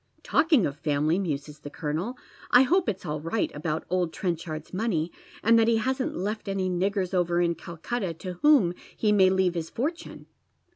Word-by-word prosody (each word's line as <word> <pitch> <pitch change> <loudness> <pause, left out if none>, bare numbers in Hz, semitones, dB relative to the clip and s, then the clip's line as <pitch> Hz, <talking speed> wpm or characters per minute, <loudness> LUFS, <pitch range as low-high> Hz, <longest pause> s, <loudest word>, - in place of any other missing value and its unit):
" - - -34
Talking 300 - +3
of 145 +1 -4
family," 150 +3 +1
muses 150 -4 -4
the 145 - -8
colonel, 160 - -3 0.2
" - - -23
I 245 - +8
hope 350 +6 +2
it's 190 -2 -4
all 150 0 -3
right 165 +8 -1
aboTit 155 +1 -3
old 180 -2 0
IVenchard's 165 -4 -4
money, 185 -5 -1 0.3
and 230 +1 +5
that 225 - +4
ho 230 - +3
hasn't 260 +3 -1
left 210 +4 -3
any 190 -1 -1
niggera 190 +1 -1
over 175 -1 +2
in 170 -1 +2
Calcutta 170 +3 -4
to 180 +3 -6
whom 280 - +5 0.2
he 215 - +2
may 190 -3 +5
leave 190 -1 +2
his 165 -2 -4
fortune." 310 +8 -4
185 Hz, 190 wpm, -27 LUFS, 165-225 Hz, 0.3 s, I